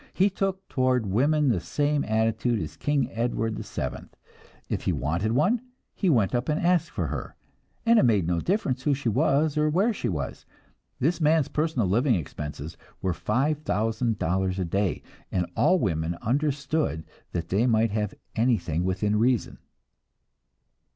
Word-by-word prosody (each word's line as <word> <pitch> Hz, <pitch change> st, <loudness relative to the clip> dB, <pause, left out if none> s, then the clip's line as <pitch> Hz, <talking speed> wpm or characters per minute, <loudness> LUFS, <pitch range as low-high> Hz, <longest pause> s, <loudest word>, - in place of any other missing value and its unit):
He 195 Hz, +2 st, +3 dB
took 195 Hz, 0 st, -2 dB
toward 130 Hz, -3 st, +1 dB
women 140 Hz, +9 st, +2 dB
the 110 Hz, -7 st, +2 dB
same 145 Hz, -, 0 dB
attitude 110 Hz, +1 st, +1 dB
as 80 Hz, -3 st, -5 dB
King 145 Hz, -, 0 dB
Edward 115 Hz, -1 st, -1 dB
VII; -, -, -5 dB, 0.6 s
if -, -, -3 dB
he -, -, +2 dB
wanted 85 Hz, +10 st, -1 dB
one, 185 Hz, -, +2 dB, 0.3 s
he 190 Hz, -, 0 dB
went 115 Hz, -, +3 dB
up 125 Hz, +2 st, -1 dB
and 150 Hz, -, +1 dB
asked 175 Hz, -1 st, +2 dB
for -, -, -2 dB
her, -, -, -5 dB, 0.5 s
and 230 Hz, 0 st, +6 dB
it -, -, +4 dB
made 105 Hz, -7 st, +3 dB
no 85 Hz, 0 st, 0 dB
difference 140 Hz, -, 0 dB
who 140 Hz, +1 st, +2 dB
she 130 Hz, -3 st, -1 dB
was, 145 Hz, +5 st, +2 dB
or 155 Hz, 0 st, +3 dB
where 195 Hz, +9 st, +2 dB
she -, -, -3 dB
was. 75 Hz, -8 st, -4 dB, 0.6 s
This 165 Hz, +6 st, +1 dB
man's 155 Hz, -1 st, +3 dB
personal 150 Hz, -, 0 dB
living 120 Hz, +6 st, +3 dB
expenses 75 Hz, -1 st, -6 dB, 0.3 s
were 95 Hz, -2 st, +1 dB
five 135 Hz, -, 0 dB
thousand 115 Hz, -3 st, 0 dB
dollars 95 Hz, +2 st, 0 dB
a 95 Hz, -, -1 dB
day, 95 Hz, +3 st, -1 dB, 0.3 s
and 90 Hz, -2 st, 0 dB
all 185 Hz, -, +4 dB
women 85 Hz, -, -1 dB
understood 140 Hz, -, 0 dB, 0.3 s
that 85 Hz, -1 st, -3 dB
they 105 Hz, +7 st, +2 dB
might 115 Hz, -2 st, +3 dB
have 105 Hz, -1 st, -2 dB, 0.2 s
anything 95 Hz, -9 st, +1 dB
within 105 Hz, +3 st, 0 dB
reason. 120 Hz, 0 st, +1 dB
120 Hz, 160 wpm, -26 LUFS, 95-150 Hz, 0.6 s, and